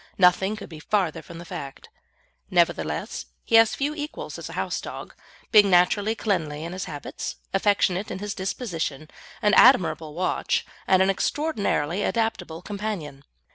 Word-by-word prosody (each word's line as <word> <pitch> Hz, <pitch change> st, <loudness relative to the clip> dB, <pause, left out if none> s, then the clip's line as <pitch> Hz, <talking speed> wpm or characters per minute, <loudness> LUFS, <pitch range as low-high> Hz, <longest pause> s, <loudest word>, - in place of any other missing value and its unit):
Nothing 190 Hz, +3 st, +4 dB
could 215 Hz, -, -9 dB
be 160 Hz, -2 st, -10 dB
further 185 Hz, 0 st, 0 dB
from 170 Hz, -, -11 dB
the 170 Hz, -, -9 dB
fact. 140 Hz, -4 st, -8 dB, 0.6 s
Nevertheless, 80 Hz, -, 0 dB, 0.2 s
he -, -, -8 dB
has 225 Hz, -1 st, +5 dB
few 285 Hz, +2 st, -1 dB
equals 300 Hz, 0 st, -6 dB
as -, -, -7 dB
a -, -, -8 dB
house -, -, -2 dB
dog, -, -, -8 dB, 0.4 s
being 210 Hz, -3 st, +7 dB
naturally 200 Hz, +4 st, +3 dB
cleanly 160 Hz, -9 st, -1 dB
in 170 Hz, +2 st, -5 dB
his 185 Hz, -, -4 dB
habits, 145 Hz, -, -6 dB, 0.2 s
affectionate 195 Hz, -1 st, +2 dB
in -, -, -4 dB
his 205 Hz, +1 st, -4 dB
disposition, 165 Hz, -, -4 dB, 0.3 s
an 210 Hz, 0 st, +4 dB
admirable 170 Hz, -, +5 dB
watch, 185 Hz, +2 st, 0 dB, 0.2 s
and 190 Hz, 0 st, +5 dB
an 195 Hz, -, +3 dB
extraordinarily 200 Hz, -, -1 dB
adaptable 180 Hz, -9 st, -2 dB
companion. 195 Hz, -10 st, -5 dB
185 Hz, 150 wpm, -25 LUFS, 160-210 Hz, 0.6 s, being